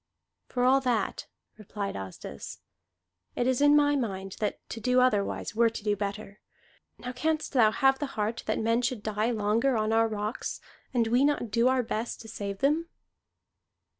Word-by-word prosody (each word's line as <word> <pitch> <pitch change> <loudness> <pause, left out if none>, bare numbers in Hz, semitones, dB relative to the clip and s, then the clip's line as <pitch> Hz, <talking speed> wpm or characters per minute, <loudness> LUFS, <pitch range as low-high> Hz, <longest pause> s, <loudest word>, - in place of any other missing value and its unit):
"For 245 - -1
all 265 +2 +5
that," 240 -6 -1 0.3
replied 205 -1 -5
Asdis, 95 -7 -7 0.8
"it 245 - 0
is 255 +1 +1
in 290 0 +6
my 290 0 +4
mind 195 -7 -3
that 210 - -1
to 225 - -5
do 250 +3 +3
otherwise 225 -7 +1
were 230 +1 +4
to 225 -1 -8
do 210 -1 +1
better. 200 0 -5 0.6
Now 250 - -6
canst 310 +5 -1
thou 230 -5 +5
have 270 +4 +2
the 290 - -2
heart 215 +2 -1
that 215 - 0
men 230 +2 +1
should 245 -4 -2
die 215 +1 0
longer 230 +3 +1
on 215 0 0
our 225 0 +4
rocks, 215 +1 -4 0.3
and 240 -3 +2
we 240 +4 +3
not 285 -6 +1
do 235 +3 +3
our 260 -1 +2
best 225 +1 -3
to 225 - -11
save 200 -2 -5
them?" 310 +4 +1
230 Hz, 175 wpm, -28 LUFS, 210-255 Hz, 0.8 s, in